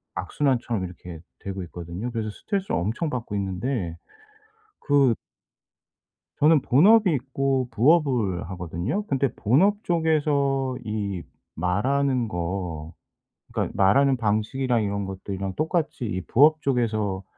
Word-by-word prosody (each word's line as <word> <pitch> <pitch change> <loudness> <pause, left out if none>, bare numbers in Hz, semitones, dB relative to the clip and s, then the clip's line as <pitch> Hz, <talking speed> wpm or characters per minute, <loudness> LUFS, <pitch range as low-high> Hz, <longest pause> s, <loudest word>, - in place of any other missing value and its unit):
악순환처럼 120 -8 -1
이렇게 90 -1 -9 0.2
되고 95 -1 -5
있거든요. 85 +6 -6
그래서 110 -2 -3
스트레스를 195 - -2
엄청 115 - -2
받고 120 -6 -4
있는데 95 -2 -2 0.8
그 140 -5 +3 1.3
저는 155 0 +5
본업이 190 - +5
있고 135 -1 0
부업을 120 - +2
하거든요. 90 - -3
근데 135 -1 +1
본업 190 - +2
쪽에서 145 -5 +1
이 105 -4 -3 0.3
말하는 125 - +1
거 85 -4 -4 0.6
그러니까 - - -1
말하는 130 +8 +4
방식이랑 115 +2 0
이런 100 0 -2
것들이랑 95 0 -5
똑같이 155 -4 -1
이 95 -4 -2
부업 155 +4 +5
쪽에서 110 -7 0
120 Hz, 285 characters per minute, -25 LUFS, 95-140 Hz, 1.3 s, 저는